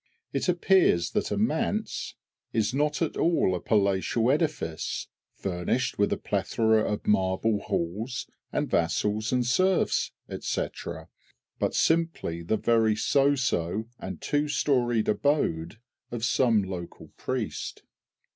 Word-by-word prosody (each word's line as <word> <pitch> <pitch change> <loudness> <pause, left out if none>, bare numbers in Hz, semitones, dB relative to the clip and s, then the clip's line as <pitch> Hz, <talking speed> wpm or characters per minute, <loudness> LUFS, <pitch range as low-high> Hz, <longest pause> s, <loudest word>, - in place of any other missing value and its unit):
It - - 0
appears 175 - +3
that - - -1
a - - -1
"Manse" - - -1 0.4
is 110 +1 +1
not 150 +4 +1
at 160 - -3
all 165 - +2
a 90 - -1
palatial 100 +5 +2
edifice, 140 - -1 0.3
furnished 95 +8 -2
with 100 - +3
a - - +1
plethora 110 -1 +1
of 105 - -3
marble 100 +2 +2
halls 105 +11 -3 0.3
and - - 0
vassals 105 +6 0
and 125 -1 +1
serfs, 185 +10 +2 0.3
&c., - - -1 0.9
but - - 0
simply 165 - +1
the 85 +6 0
very 110 -1 +3
so 140 +6 +3
so 110 -3 -1
and 95 -4 -6
two 145 +1 +1
storied 120 -6 +1
abode 105 - 0 0.3
of 120 -1 -2
some 120 -4 +3
local 90 -2 -7
priest! - - -4
110 Hz, 125 wpm, -27 LUFS, 95-135 Hz, 0.9 s, appears